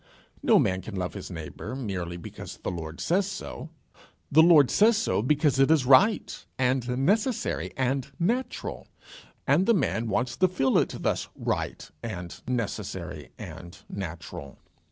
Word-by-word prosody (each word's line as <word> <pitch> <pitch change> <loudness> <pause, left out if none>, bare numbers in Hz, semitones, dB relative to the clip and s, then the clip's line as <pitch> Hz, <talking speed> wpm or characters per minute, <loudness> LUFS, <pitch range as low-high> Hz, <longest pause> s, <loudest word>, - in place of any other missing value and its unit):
No - - +5
man 95 0 +2
can 100 +2 -8
love 90 -1 -2
his 100 - -7
neighbour 85 +8 -6
merely 95 -9 -4
because 85 - -9
the - - -4
Lord 80 -2 -6
says 190 +3 +1
so. 195 -4 -7 0.6
The 155 +3 +7
Lord 160 -5 +7
says 220 +1 +5
so 220 - +1
because 140 +2 +2
it 135 - +5
is 155 -5 +4
right 170 - +4
and 125 -1 +1
necessary 220 - 0
and 130 0 0
natural, 240 +8 -2 0.6
and 150 +8 +3
the 230 - +5
man 120 - 0
wants 120 +3 0
to 185 - +4
feel 135 -8 +2
it - - -1
thus - - -1
right - - -3
and 90 -6 -6
necessary 95 - -4
and 85 0 -9
natural. 85 -7 -7
125 Hz, 150 wpm, -27 LUFS, -, 0.6 s, The